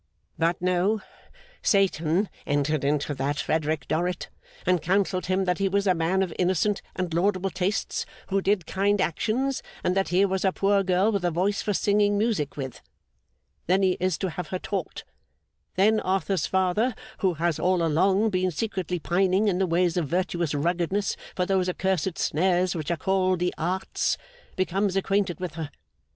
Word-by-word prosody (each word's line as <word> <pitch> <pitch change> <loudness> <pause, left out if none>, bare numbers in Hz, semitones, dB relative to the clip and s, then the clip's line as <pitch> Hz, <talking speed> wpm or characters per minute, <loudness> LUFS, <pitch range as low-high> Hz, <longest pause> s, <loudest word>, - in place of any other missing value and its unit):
But, 165 +1 +1
no. 185 +4 +2 0.6
Satan 190 -1 +2 0.2
entered 145 0 +1
into 145 +1 0
that 140 +2 -2
Frederick 155 -1 -1
Dorrit, 175 +2 -1 0.4
and 180 -2 +2
counselled 185 +1 0
him 190 +1 +1
that 180 0 0
he 195 -1 +2
was 200 +1 +1
a 185 - +4
man 175 +3 +1
of 175 -4 -4
innocent 185 +3 +1
and 180 -3 -2
laudable 190 +2 +1
tastes 185 +4 -1 0.2
who 195 0 +1
did 195 -3 +1
kind 200 +1 +1
actions, 245 - 0 0.2
and 180 - +1
that 195 0 +1
here 185 +3 +3
was 190 -1 -1
a 190 - +3
poor 200 +1 +2
girl 190 +3 +2
with 200 -4 -1
a 175 - +2
voice 185 +5 0
for 205 -2 -1
singing 205 +1 +2
music 205 -11 0
with. 130 -3 -6 0.9
Then 190 +3 +3
he 185 -1 +3
is 185 -2 0
to 190 -3 -2
have 180 - -5
her 185 - -3
taught. 190 -2 -4 0.7
Then 215 +3 +4
Arthur's 190 0 0
father, 190 +6 +1 0.2
who 185 -4 +1
has 165 0 0
all 180 0 +2
along 190 +7 +2
been 185 -1 +1
secretly 185 0 -2
pining 190 +4 +2
in 185 -3 +1
the 190 - +2
ways 175 0 +1
of 165 -4 0
virtuous 170 -2 -1
ruggedness 175 +6 0 0.2
for 180 - 0
those 185 -1 +1
accursed 190 -1 -1
snares 180 +2 +1
which 155 -2 -4
are 170 - 0
called 185 +2 +1
the 180 +1 -1
Arts, 180 +4 -1 0.4
becomes 185 +2 0
acquainted 195 -1 0
with 180 -3 -4
her. 160 -3 -5
185 Hz, 170 wpm, -26 LUFS, 170-195 Hz, 0.9 s, a